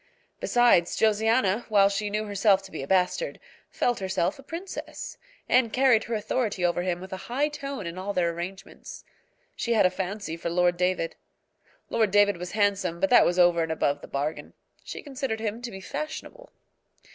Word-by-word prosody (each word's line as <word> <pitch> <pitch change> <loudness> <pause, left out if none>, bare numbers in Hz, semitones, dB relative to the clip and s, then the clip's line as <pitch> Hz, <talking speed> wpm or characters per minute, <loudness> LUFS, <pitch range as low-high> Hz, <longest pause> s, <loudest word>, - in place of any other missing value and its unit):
Besides, 240 -8 +3
Josiana, 220 0 +2
while 200 -2 +5
she 200 +1 -2
knew 215 +1 -2
herself 200 -1 +3
to 195 - -12
be 155 - -5
a 135 - -6
bastard, 190 - +1 0.3
felt 245 -1 0
herself 190 - -1
a - - -9
princess, 335 +7 -7 0.3
and 245 -3 +3
carried 255 -3 +4
her 235 - -2
authority 215 -3 -1
over 175 0 +1
him 175 -1 -1
with 190 +1 -9
a - - -3
high 280 +5 +1
tone 280 -7 -6
in 170 +2 -5
all 195 +2 -3
their 175 -3 +1
arrangements. 175 +3 -8 0.5
She 235 - -1
had 220 - +4
a 185 - +4
fancy 190 -2 -4
for 170 - -3
Lord 175 +1 +2
David. 180 -1 -1 0.7
Lord 220 -2 +2
David 205 -1 +4
was 180 +1 -7
handsome, 200 -5 +1
but 195 +4 +1
that 245 - +7
was 175 - 0
over 175 -1 +5
and 165 0 -1
above 145 -2 0
the - - -10
bargain. 145 +3 -4 0.3
She - - -7
considered 265 -5 -3
him 220 +1 -3
to 245 - -5
be 190 -4 -8
fashionable. 310 - -6
200 Hz, 185 wpm, -26 LUFS, 180-235 Hz, 0.7 s, that